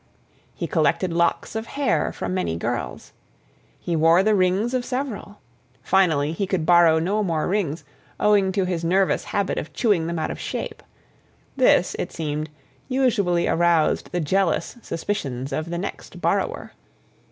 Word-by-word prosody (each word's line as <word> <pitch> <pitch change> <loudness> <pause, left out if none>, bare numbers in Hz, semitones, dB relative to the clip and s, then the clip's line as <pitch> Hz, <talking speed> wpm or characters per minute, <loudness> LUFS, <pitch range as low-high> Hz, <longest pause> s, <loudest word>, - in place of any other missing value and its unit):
He - - -3
collected 185 -3 +1
locks 170 +5 0
of 220 +1 -3
hair 280 -1 0
from - - -4
many 185 - -1
girls. - - -4 0.7
He 170 - -2
wore 165 +3 +5
the 215 +1 +3
rings 195 +5 +1
of 255 -1 0
several. 250 -5 -5 0.4
Finally 160 -6 +2
he 190 +4 -2
could 180 -4 -1
borrow 170 -1 +6
no 195 +7 0
more 165 -6 0
rings, 175 -6 -1 0.4
owing 200 -2 +3
to 195 -1 +1
his 175 -2 -2
nervous 185 +3 +2
habit 200 -2 -1
of 150 - -8
chewing 200 -9 +1
them 170 0 -3
out 160 - -2
of - - -7
shape. - - -5 0.7
This, - - +3
it - - -3
seemed, 155 -1 -3 0.4
usually 210 -10 +1
aroused 170 -2 +2
the 180 - -1
jealous 185 +8 0
suspicions 140 - -4
of 155 +3 -3
the 170 - -3
next 185 - -6
borrower. - - -1
180 Hz, 150 wpm, -23 LUFS, 165-205 Hz, 0.7 s, borrow